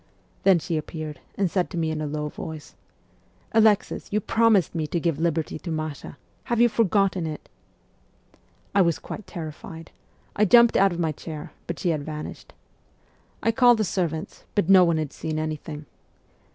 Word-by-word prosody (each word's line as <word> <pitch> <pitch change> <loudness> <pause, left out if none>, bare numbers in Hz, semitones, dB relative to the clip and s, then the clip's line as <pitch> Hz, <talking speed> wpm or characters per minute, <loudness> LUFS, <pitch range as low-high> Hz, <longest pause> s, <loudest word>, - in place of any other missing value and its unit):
Then 195 -2 +5
she 165 0 -2
appeared, 155 -1 -6 0.2
and 195 -4 0
said 185 -2 0
to 180 - -6
me 160 -1 0
in 155 -1 -3
a 150 - -2
low 150 +1 -3
voice, 155 0 -8 0.4
" - - -35 0.3
Alexis, 220 -2 +2
you 210 - +2
promised 220 -3 +3
me 160 -3 -2
to 170 - -1
give 165 -3 -1
liberty 160 -2 -1
to 175 - -7
Masha: 155 -3 -5 0.3
have 235 -1 0
you 240 0 +6
forgotten 195 -5 +1
it? 155 -1 -7 0.6
" - - -35
I 200 - +5
was 170 -3 +2
quite 215 - -8
terrified: 160 0 -8 0.4
I 210 - +3
jumped 235 +4 +6
out 195 0 +5
of 170 - -4
my 165 -2 0
chair, 155 0 -8 0.2
but 170 - -4
she 175 - -1
had 155 -3 -1
vanished. 150 0 -7 0.9
I 230 - +3
called 245 0 +5
the 215 - +1
servants, 170 -4 -3
but 205 -5 +2
no 190 -1 +8
one 170 -2 +2
had 155 -3 -3
seen 155 -1 -4
anything. 155 -1 -4
170 Hz, 180 wpm, -25 LUFS, 155-195 Hz, 0.9 s, no